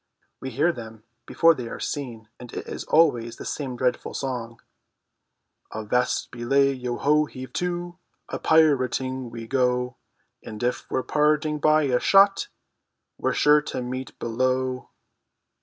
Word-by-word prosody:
We 130 - -5
hear 145 +8 +2
them 110 -6 -10 0.2
before 165 0 +5
they 125 -6 -6
are - - -7
seen, 120 -6 -5
and 120 -1 -10
it - - -6
is - - -6
always 120 -8 +3
the - - -9
same 135 -4 -4
dreadful 125 0 -1
song: 120 -4 -4 1.2
"Avast 110 +3 -1
belay, 135 +3 +2
yo 125 -2 -4
ho, 150 +1 +3
heave 130 -3 -10
to, 175 0 -3 0.3
A - - -5
pirating 130 -4 +2
we 115 -1 -8
go, 125 0 0 0.4
And 110 +1 -8
if 125 +1 -2
we're 130 - -1
parted 150 0 +1
by 155 0 +4
a 125 -3 +2
shot 195 - +4 0.7
We're - - 0
sure 150 0 +5
to 130 - -5
meet 130 +1 -6
below!" 130 +2 -1
130 Hz, 140 wpm, -25 LUFS, 120-150 Hz, 1.2 s, before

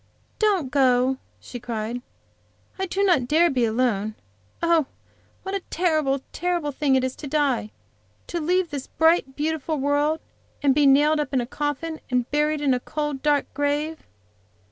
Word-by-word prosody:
"Don't 390 -11 +2
go," 260 -1 +3 0.2
she 245 - -8
cried. 235 0 -4 0.8
"I 380 - -1
do 390 +3 0
not 340 -11 +3
dare 330 +5 +4
to - - -3
be 250 -3 +2
alone. 220 -2 0 0.5
Oh, 335 -4 +3 0.6
what 385 - -5
a 395 - 0
terrible, 310 -6 +1
terrible 345 -4 -1
thing 275 -1 +1
it 260 - +2
is 260 0 -2
to 295 - -7
die! 275 -7 +1 0.6
To 345 - -3
leave 355 +2 +1
this 280 -2 -5
bright, 320 -4 +2
beautiful 310 +1 -1
world, 290 +3 +1 0.4
and 275 -2 +5
be 290 0 +4
nailed 295 +3 +5
in 265 - +2
a 240 - -1
coffin 295 +4 -3
and 250 -1 +1
buried 300 +1 +1
up - - -2
in 270 - +4
a 250 - +1
cold, 295 0 -3
dark 295 -1 +1
grave." 290 +3 -2
290 Hz, 165 wpm, -24 LUFS, 260-320 Hz, 0.8 s, and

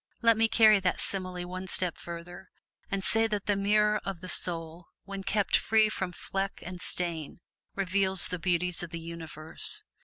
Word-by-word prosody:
Let 230 -1 +6
me 225 +1 +3
carry 220 -2 +6
that 185 -1 0
simile 185 -2 -3
one 185 +1 -6
step 180 -2 +3
further, 175 +2 -9 0.4
and 195 -1 -2
say 225 +2 +2
that 210 -2 -3
the 205 - +2
mirror 210 +1 +2
of 195 -3 -4
the 185 +1 -8
soul 165 -1 -1 0.2
when 195 0 -6
kept 195 0 +1
free 220 -1 +3
from 190 -4 -3
fleck 195 +2 -4
and 180 0 -7
stain, 165 -4 -2 0.4
reveals 190 -1 +2
the 180 - -3
beauties 180 0 0
of 175 - -6
the 170 - -5
universe. 165 -1 -1
185 Hz, 175 wpm, -29 LUFS, 175-200 Hz, 0.4 s, Let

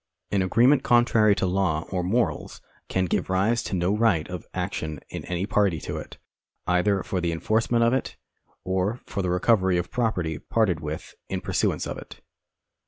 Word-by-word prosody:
An 100 - +2
agreement 120 +9 +4
contrary 115 -3 +4
to 95 - 0
law 90 -4 +1
or 90 -2 0
morals 110 +7 -1 0.3
can 95 0 +1
give 90 - -1
rise 100 +6 +2
to 95 - -3
no 90 +3 +1
right 105 -8 +2
of 90 -3 -6
action 75 -2 -3
in - - -6
any 90 +1 -2
party 100 -5 +1
to - - -4
it, - - -8 0.5
either 95 +2 +2
for 95 - -2
the 85 -1 0
enforcement 110 +7 +1
of 115 +1 +3
it, 130 - -2 0.5
or 95 +5 -1
for 100 - -3
the 90 - -1
recovery 95 0 +3
of 90 - -3
property 90 -10 -1
parted 105 -8 +1
with 75 -1 -6 0.2
in - - -2
pursuance - - 0
of - - -5
it. - - -12
95 Hz, 175 wpm, -25 LUFS, 90-110 Hz, 0.5 s, agreement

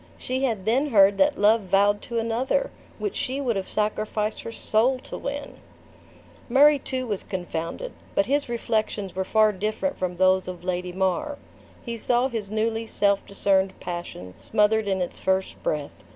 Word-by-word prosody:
She 260 +2 -1
had 220 -7 -2
then 255 +7 +2
heard 200 -4 +5
that 285 0 +3
love 215 +2 +4
vowed 200 +2 +2
to 235 - -5
another, 240 - 0 0.3
which 415 - -3
she 265 +2 -2
would 250 -5 0
have 195 -1 -3
sacrificed 215 0 -1
her 230 - -6
soul 230 +3 +2
to - - -8
win! 285 +1 -5 0.9
Murray 285 +3 +6
too 255 0 -3
was 210 -5 -2
confounded; 180 - -4 0.2
but 200 - +3
his 285 0 0
reflections 215 -4 -2
were 190 - 0
far 215 +2 +4
different 215 +8 -2
from 180 -1 -2
those 185 0 +3
of 180 -1 -7
Lady 180 0 -2
Mar. 190 +11 -1 0.5
He 235 -1 -4
saw 245 +3 +1
his 220 -5 -4
newly 225 +1 -1
self 200 -2 +1
discerned 195 -1 +1
passion 175 - -6
smothered 210 0 +2
in 190 -1 0
its 175 - -6
first 190 0 -1
breath. 150 -2 -2
215 Hz, 165 wpm, -25 LUFS, 190-245 Hz, 0.9 s, Murray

